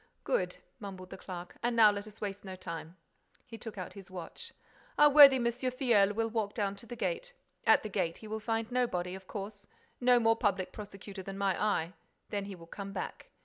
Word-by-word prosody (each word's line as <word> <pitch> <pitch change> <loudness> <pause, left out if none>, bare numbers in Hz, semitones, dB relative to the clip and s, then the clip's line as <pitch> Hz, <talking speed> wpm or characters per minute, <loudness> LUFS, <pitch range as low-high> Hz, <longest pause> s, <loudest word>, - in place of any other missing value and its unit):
"Good," - - 0 0.2
mumbled 190 -3 -8
the - - -7
clerk. 180 -1 -8
"And 240 0 0
now 220 -2 +8
let 205 +1 -5
us 215 0 -13
waste 200 -1 -4
no 190 -1 -7
time." 170 -1 -7 0.5
He 235 - -10
took 225 -3 -8
out 185 - -6
his 195 -3 -11
watch. 180 -3 -8 0.5
"Our 295 0 +7
worthy 280 -2 +10
M. 245 -2 0
Filleul 235 -4 +2
will 225 0 +1
walk 220 -2 -2
down 200 -3 -1
to 235 - -11
the 240 - -6
gate. - - -2 0.3
At - - +6
the 215 - -4
gate, 170 -3 -1
he 220 - -11
will 220 +1 -3
find 225 +1 -2
nobody, 185 -8 0
of 190 0 -9
course: 200 0 -7 0.3
no 245 -1 +5
more 225 -1 +4
public 190 -4 0
prosecutor 200 -1 -8
than 195 +1 -7
my 195 -2 +1
eye. 180 -5 +1 0.4
Then 200 -1 -2
he 200 -1 -7
will 170 -2 -13
come 200 +3 -7
back. - - -6
205 Hz, 210 wpm, -32 LUFS, 190-230 Hz, 0.5 s, worthy